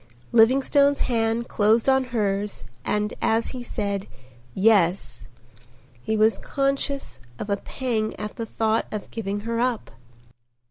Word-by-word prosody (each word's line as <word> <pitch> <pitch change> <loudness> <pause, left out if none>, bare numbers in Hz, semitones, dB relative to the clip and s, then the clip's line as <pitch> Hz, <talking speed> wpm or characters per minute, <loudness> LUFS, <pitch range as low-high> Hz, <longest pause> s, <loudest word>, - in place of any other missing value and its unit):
Livingstone's 275 +4 +4
hand 230 -1 0
closed 220 +3 +2
on 265 -1 +4
hers 205 -4 -2 0.2
and 210 +5 -1
as 225 +1 +1
he 255 - -6
said 200 -5 -3 0.5
"Yes," 190 - +2 0.7
he 220 - -1
was 220 +1 +3
conscious 275 - -2 0.2
of 205 - -5
a 200 - +2
pang 220 -1 -2
at 210 0 -6
the 230 - -5
thought 220 0 0
of 210 -1 -6
giving 205 -2 -3
her 230 +2 -2
up. 245 -2 -1
225 Hz, 130 wpm, -24 LUFS, 210-245 Hz, 0.7 s, Livingstone's